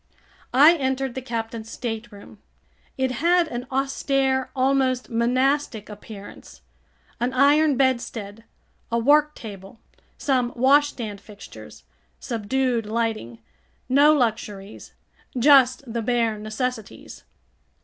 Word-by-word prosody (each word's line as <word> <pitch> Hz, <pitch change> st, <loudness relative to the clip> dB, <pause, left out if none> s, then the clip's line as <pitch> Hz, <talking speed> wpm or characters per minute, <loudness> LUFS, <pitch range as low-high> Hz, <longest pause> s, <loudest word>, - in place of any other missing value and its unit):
I 305 Hz, +6 st, +7 dB
entered 265 Hz, -2 st, -2 dB
the 260 Hz, -, -5 dB
captain's 225 Hz, -2 st, -5 dB
stateroom. 225 Hz, -3 st, -7 dB, 0.6 s
It 260 Hz, -1 st, 0 dB
had 340 Hz, +6 st, +2 dB
an 245 Hz, -1 st, -5 dB
austere, 270 Hz, 0 st, 0 dB
almost 260 Hz, -1 st, +1 dB
monastic 250 Hz, 0 st, 0 dB
appearance. 205 Hz, -1 st, -12 dB, 0.6 s
An 245 Hz, +2 st, -1 dB
iron 285 Hz, +2 st, +4 dB
bedstead, 235 Hz, -5 st, -1 dB, 0.5 s
a 235 Hz, -, +1 dB
worktable, 230 Hz, -8 st, 0 dB, 0.4 s
some 255 Hz, -3 st, 0 dB
washstand 260 Hz, -5 st, +1 dB
fixtures. 205 Hz, -2 st, -13 dB, 0.4 s
Subdued 235 Hz, 0 st, -1 dB
lighting. 215 Hz, -, -3 dB, 0.4 s
No 285 Hz, +4 st, +5 dB
luxuries. 215 Hz, -7 st, -2 dB, 0.4 s
Just 260 Hz, 0 st, +5 dB
the 235 Hz, -1 st, -4 dB
bare 230 Hz, -2 st, 0 dB
necessities. 220 Hz, +1 st, -5 dB
250 Hz, 95 wpm, -23 LUFS, 225-270 Hz, 0.6 s, I